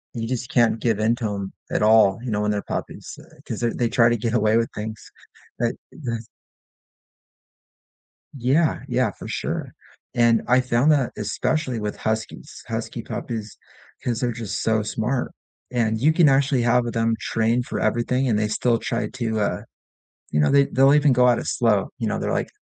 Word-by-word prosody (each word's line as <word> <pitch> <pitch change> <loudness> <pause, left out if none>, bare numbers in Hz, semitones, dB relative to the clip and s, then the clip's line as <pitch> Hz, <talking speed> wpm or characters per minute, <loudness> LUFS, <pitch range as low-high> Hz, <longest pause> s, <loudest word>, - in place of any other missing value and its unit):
you 115 -1 -3
just 125 0 -3
can't 115 -2 +3
give 115 -3 +1
into 115 +2 +1
'em 100 -1 -5 0.2
at - - 0
all, 105 -3 +5
you 125 - -4
know, 105 -1 0
when 105 - 0
they're 105 -1 -2
puppies, - - -6
uh, - - -19
'cause - - -5
they're 120 -1 0
they 120 - +1
try 120 -1 +4
to 120 - +1
get 115 +1 -2
away 110 -1 +3
with 115 0 +1
things, 110 0 -5 0.6
but 120 -1 0 0.2
the 115 -6 -5 2.1
Yeah, 135 +6 +2
yeah, - - +1
for - - -10
sure. - - -4 0.4
And 120 -1 +4
I 125 +1 +4
found 125 +4 +2
that 140 -5 +2
especially 125 +4 -1
with 105 -1 -4
huskies, 110 0 -4
husky - - -4
puppies, 110 -2 -6 0.5
'cause 120 -2 -1
they're 120 -1 0
just 115 -3 -4
so 110 -1 +2
smart, 110 +4 -2 0.4
and 110 -3 0
you 145 +7 +4
can 165 -1 +5
actually 135 -1 +2
have 120 0 +2
them 115 0 +1
trained 115 +2 0
for - - -4
everything 120 +4 0
and 110 -4 +2
they 105 0 +1
still 115 +2 +1
try 115 +1 -2
to, 115 -3 -2
uh 105 - -1 0.7
you 75 - +1
know, 75 - +3
they 140 0 +5
they'll 135 +2 +4
even 150 -1 +4
go 125 0 +4
at 120 - +3
it - - -6
slow, 105 -5 +1
you - - -2
know, - - -1
they're - - -2
like - - -1
115 Hz, 190 wpm, -23 LUFS, 110-125 Hz, 2.1 s, all